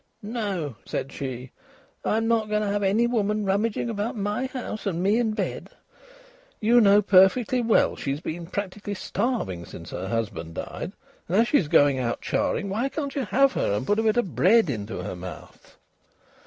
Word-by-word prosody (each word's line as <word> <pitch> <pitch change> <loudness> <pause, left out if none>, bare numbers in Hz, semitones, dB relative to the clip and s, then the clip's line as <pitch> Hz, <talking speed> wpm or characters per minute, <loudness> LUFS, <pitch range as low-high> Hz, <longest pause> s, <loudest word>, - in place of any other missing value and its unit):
"No," 200 - -3
said 135 - -4
she. 130 -2 -6 0.5
"I'm 225 +1 +1
not 225 -2 +1
going 210 0 +1
to - - -1
have 205 0 0
any 205 +4 +3
woman 210 -3 0
rummaging 205 +4 0
about 225 +2 -3
my 210 +5 -1
house, 245 -5 -5
and 175 -2 -1
me 205 +4 +3
in 225 -3 +1
bed." - - -3 0.9
"You 235 +3 +5
know 205 0 +6
perfectly 205 +7 +4
well 230 -1 +3
she's 140 +1 -3
been 165 +1 -5
practically 205 +2 -4
starving 195 - -2
since 85 -1 -10
her 95 +2 -4
husband 95 -7 -3
died, - - -5 0.3
and 180 - +1
as 230 +2 +4
she's 195 - +3
going 145 -2 +4
out 120 -2 -1
charing, 200 - -1
why 225 +8 -1
can't 280 -2 -4
you 275 -3 -1
have 270 +5 +3
her - - 0
and 105 +5 -1
put 205 +6 +1
a - - +3
bit 220 +1 +2
of 200 -8 0
bread 210 -3 +4
into 105 -5 -5
her - - -5
mouth?" 90 -3 -11
205 Hz, 180 wpm, -25 LUFS, 145-225 Hz, 0.9 s, know